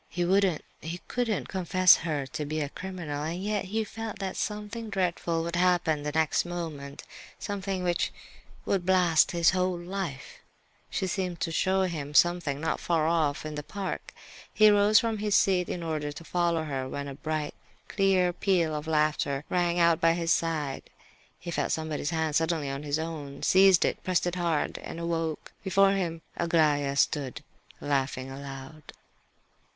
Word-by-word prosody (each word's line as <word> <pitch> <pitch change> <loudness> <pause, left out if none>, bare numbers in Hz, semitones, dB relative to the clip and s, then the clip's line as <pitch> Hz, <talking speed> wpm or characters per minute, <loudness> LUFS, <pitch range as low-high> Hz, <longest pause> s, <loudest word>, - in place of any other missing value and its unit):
He 175 -1 -1
wouldn't, 190 -3 +2 0.2
he 165 +3 -6
couldn't 235 -5 -1
confess 185 -1 +5
her 150 -5 -2
to 155 +3 -5
be 155 +2 -3
a 145 -2 -2
criminal, 170 -5 -5
and 165 +3 -3
yet 210 -1 -1
he 220 +4 -1
felt 225 0 -6
that 190 -1 -4
something 210 +2 -4
dreadful 175 -4 -1
would 170 +1 -3
happen 175 -4 +2
the 150 0 -3
next 160 0 +2
moment, 160 -5 -6 0.3
something 195 -2 -3
which 175 -1 0 0.5
would 195 -3 0
blast 180 -3 +4
his 170 -1 +3
whole 185 -1 0
life. 175 -5 -5 0.5
She - - -1
seemed 180 -2 -2
to 170 - 0
wish - - -5
to - - +2
show 190 0 +2
him 150 -5 -4
something, 175 -5 +3
not 160 +1 -1
far 165 -3 +1
off, 155 -3 +1
in 155 - -4
the 150 - -4
park. 190 +6 -5 0.4
He 215 0 +6
rose 205 +1 +5
from 225 -1 +1
his 210 -1 +1
seat 185 -2 +3
in 175 - -3
order 155 -2 -2
to 155 - -9
follow 170 -1 0
her, 135 -4 -3
when 140 +1 -4
a 140 - -6
bright, 155 +1 -3 0.3
clear 185 -2 +2
peal 175 -4 +1
of 150 +1 -4
laughter 150 -3 +1
rang 175 -1 +1
out 170 -1 +4
by 165 0 +5
his 170 -1 +1
side. 155 -5 -1 0.6
He 170 - -7
felt - - -1
somebody's 155 -2 -2
hand 160 -2 -1
suddenly 160 -3 +1
in 135 +1 -4
his 145 0 -1
own, 155 -4 -6
seized 190 -1 +6
it, - - -2
pressed 185 -2 +1
it 175 - -1
hard, 170 -4 -1
and 165 - -7
awoke. 165 -2 -3
Before 195 0 +4
him 170 -4 -2
stood - - -18
Aglaya, 150 -4 +2 0.8
laughing 135 -2 -1
aloud. 135 +2 -9
170 Hz, 175 wpm, -28 LUFS, 150-185 Hz, 0.8 s, He